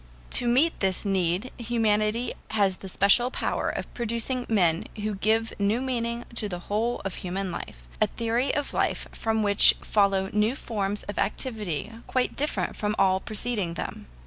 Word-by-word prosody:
To 245 - +6
meet 270 +8 +2
this 190 0 0
need 190 +4 0
humanity 225 0 0
has 200 -4 +1
the 190 - -9
special 200 +7 +3
power - - -2
of - - -5
producing 240 +2 0
men 175 -7 +2
who 215 0 -3
give 220 +3 0
a - - -10
new 205 +4 +2
meaning 240 -2 -3
to 210 - -1
the 180 - -4
whole 215 +7 -2
of 195 - -3
human 185 +1 -3
life - - -8
a - - +5
theory 235 +3 -1
of 290 -1 -2
life - - -1
from 220 -1 -1
which 200 0 +8
follow 195 -2 +1
new 210 +4 +1
forms 205 -5 -3
of 205 - -6
activity 215 - -2
quite 255 -1 0
different 295 +2 -1
from 210 0 -2
all 190 0 +3
preceding 210 -5 -1
them. - - -6
215 Hz, 170 wpm, -26 LUFS, 195-235 Hz, -, which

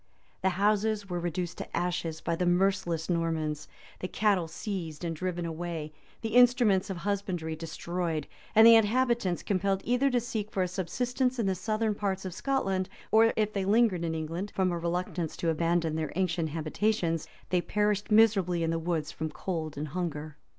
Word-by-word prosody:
[*] - - -36
The 190 - +3
houses 210 0 +1
were 175 - -1
reduced 175 0 -3
to - - -5
ashes 170 -2 -2
by 170 - -1
the 180 +1 0
merciless 175 -3 +1
Normans; 160 -3 -1 0.3
the 185 - -3
cattle 195 -4 +1
seized 170 -3 -5
and 165 -1 -2
driven 175 +1 -3
away; 165 -2 -4 0.3
the 225 - -2
instruments 245 -6 +5
of 190 - -3
husbandry 185 -4 -2
destroyed; 165 -1 -3 0.3
and 220 +1 +8
the 230 - +10
inhabitants 225 -4 +2
compelled 195 0 0
either 250 +3 +2
to 250 -2 +2
seek 220 -3 -4
for 190 - 0
a - - 0
subsistence 245 +8 -1
in 230 - 0
the 190 - +2
southern 215 +3 -1
parts 195 -2 -2
of 185 - -4
Scotland, 195 -8 -1 0.2
or 225 +1 +6
if 215 -1 0
they 195 - -1
lingered 200 -3 +3
in 165 -1 -1
England, 165 +5 -4
from 185 -1 +2
a 170 - -2
reluctance 170 -1 -2
to 170 - 0
abandon 165 0 +1
their 160 -2 -2
ancient 170 -3 0
habitations, 165 +1 -1 0.2
they 180 -1 +3
perished 210 +2 0
miserably 200 -6 +4
in 165 - +1
the 165 - 0
woods 165 -2 -2
from 160 -1 -4
cold 155 -1 -4
and 150 +1 -3
hunger. 155 -2 -4
180 Hz, 180 wpm, -29 LUFS, 165-210 Hz, 0.3 s, the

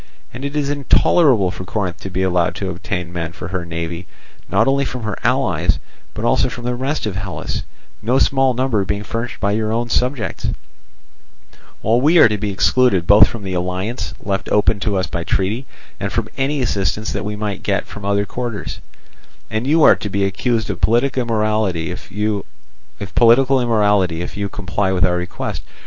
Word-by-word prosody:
And 125 - -7
it 140 +1 -4
is 145 -1 0
intolerable 140 - +3
for 95 - -7
Corinth 90 -2 -3
to 95 - -6
be 95 0 -1
allowed 90 -2 +1
to 95 -2 -3
obtain 90 0 -4
men 85 -1 -4
for 85 - -7
her 90 -2 -3
navy 85 +2 -5 0.4
not 110 +4 +3
only 140 +1 +3
from 125 -3 -5
her 105 -3 -2
allies, - - +2 0.4
but - - -3
also - - +3
from 120 - -8
the 125 +1 -1
rest 135 +3 -2
of 105 -3 -3
Hellas, 95 -6 -4 0.4
no 125 +4 +2
small 135 -2 +3
number 125 -5 +1
being 100 +2 -2
furnished 115 +3 -4
by 100 - +1
your 110 +1 0
own 120 +1 -1
subjects; 125 0 -1 1.4
while 115 +3 +3
we 155 +6 +5
are 155 - +9
to 105 -1 -2
be 105 0 -2
excluded 100 -2 +3
both 105 +3 +7
from 115 -3 -7
the 95 -1 -4
alliance 90 +3 -3
left 100 -1 -2
open 105 0 +3
to 100 -1 0
us 95 - +1
by 85 -2 -4
treaty, 105 +10 -1 0.3
and 100 0 -2
from 115 -2 -1
any 140 +1 0
assistance 105 -1 -1
that - - -3
we 105 0 -3
might 105 -2 -3
get 100 0 0
from 105 - -10
other 100 0 +1
quarters, 120 -2 -5 0.7
and 110 +4 -1
you 155 +2 +4
are - - +8
to 105 - -5
be 100 0 0
accused 110 +2 0
of 90 - -7
political 125 +4 +2
immorality 110 -7 0
if 90 - -9
you 105 0 -1 2.1
comply 100 -1 -1
with 95 -1 +3
our 90 -1 +1
request. 90 +1 -4
105 Hz, 180 wpm, -19 LUFS, 95-120 Hz, 2.1 s, are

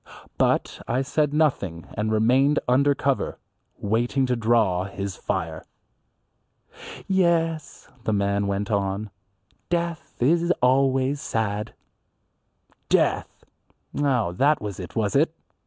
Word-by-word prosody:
But - - +1
I 125 +3 0
said 150 +2 0
nothing 130 - 0
and 110 +1 -1
remained 130 +7 +3
under 140 +3 +3
cover, 135 -1 -1 0.4
waiting 120 +6 0
to 125 -1 0
draw 110 -6 +2
his 95 0 -5
fire. - - -3 1.4
"Yes," 165 -4 0 0.2
the - - +1
man 100 0 +1
went 100 +2 -2
on, 100 +1 -1 0.6
"death 170 -1 -2
is 170 +7 +3
always 135 +2 +2
sad." 105 -1 -2 1.1
Death! - - +1 0.5
Oh, 130 -10 +1
that 140 +11 +2
was 100 -3 -6
it, 90 - -8
was 105 0 0
it? 160 +3 +3
125 Hz, 110 wpm, -24 LUFS, 100-145 Hz, 1.4 s, remained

